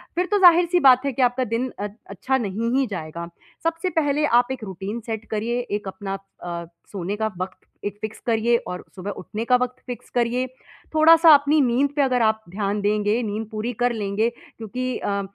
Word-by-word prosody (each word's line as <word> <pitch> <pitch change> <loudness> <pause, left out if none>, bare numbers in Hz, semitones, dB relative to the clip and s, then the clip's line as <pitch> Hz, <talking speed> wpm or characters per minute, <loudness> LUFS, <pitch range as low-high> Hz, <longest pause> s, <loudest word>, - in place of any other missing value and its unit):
फिर 360 +2 +1
तो 410 - +3
ज़ाहिर-सी 350 -1 +6
बात 260 -3 +6
है 280 - +1
कि 260 - -2
आपका 250 +1 +2
दिन 245 +2 -2
अ 205 - -2 0.2
अच्छा 255 +7 -1
नहीं 225 0 -2
ही 270 - +3
जाएगा। 170 -4 -6 0.4
सबसे 330 +2 -1
पहले 300 -3 +1
आप 245 -1 +3
एक 260 -3 -5
रूटीन 195 +3 -5
सेट 220 -1 -4
करिए, 225 +3 -1
एक 205 -1 -2
अपना 195 0 -5 0.3
अ, 170 -1 -4 0.3
सोने 195 0 -3
का 220 +1 -1
वक़्त 185 +1 -5 0.3
एक 205 0 -4
फिक्स 215 0 -5
करिए 230 0 +2
और 180 - -5
सुबह 195 +2 -5
उठने 210 +5 -5
का 250 - +4
वक़्त 250 0 -3
फिक्स 245 -1 -7
करिए। 245 +1 0 0.5
थोड़ा-सा 325 +1 +8
अपनी 290 +2 +3
नींद 260 +2 +2
पे 290 - +2
अगर 255 -3 +2
आप 220 -1 +2
ध्यान 200 +2 -2
देंगे, 210 +2 +1
नींद 215 0 -3
पूरी 220 +3 -3
कर 245 - +3
लेंगे, 210 +1 0 0.3
क्योंकि 250 +3 -3
अ, 200 0 -1
230 Hz, 195 wpm, -23 LUFS, 205-260 Hz, 0.5 s, थोड़ा-सा